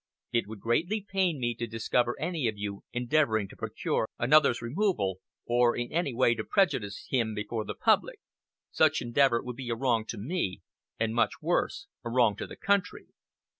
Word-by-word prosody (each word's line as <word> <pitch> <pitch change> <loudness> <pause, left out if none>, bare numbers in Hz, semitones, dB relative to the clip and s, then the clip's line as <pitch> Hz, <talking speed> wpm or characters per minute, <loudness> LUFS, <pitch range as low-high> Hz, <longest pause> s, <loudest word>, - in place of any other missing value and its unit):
It 115 -3 +1
would 105 -2 -9
greatly 175 - 0
pain 185 -6 +1
me 120 -1 0
to 120 +1 -4
discover 115 +2 0
any 160 -4 -1
of 110 -2 -2
you 100 -1 -5
endeavoring 120 -4 +1
to - - -13
procure 110 - -2
another's 135 -1 +4
removal, 115 - -1 0.3
or 120 0 +3
in 120 0 -3
any 170 -3 0
way 120 0 +3
to 110 -2 -4
prejudice 110 - 0
him 115 -4 +1
before 105 +1 -3
the - - -5
public. - - +2 0.5
Such - - +3
endeavor 120 0 +3
would 125 -1 -6
be 130 -3 -6
a 115 - 0
wrong 115 -3 +1
to 115 - -5
me, 115 - -2 0.4
and 110 0 0
much 115 0 +2
worse, 175 +4 -1 0.2
a 120 - -4
wrong 115 -3 +3
to - - -5
the - - -9
country. 200 -2 0
120 Hz, 180 wpm, -29 LUFS, 110-150 Hz, 0.5 s, another's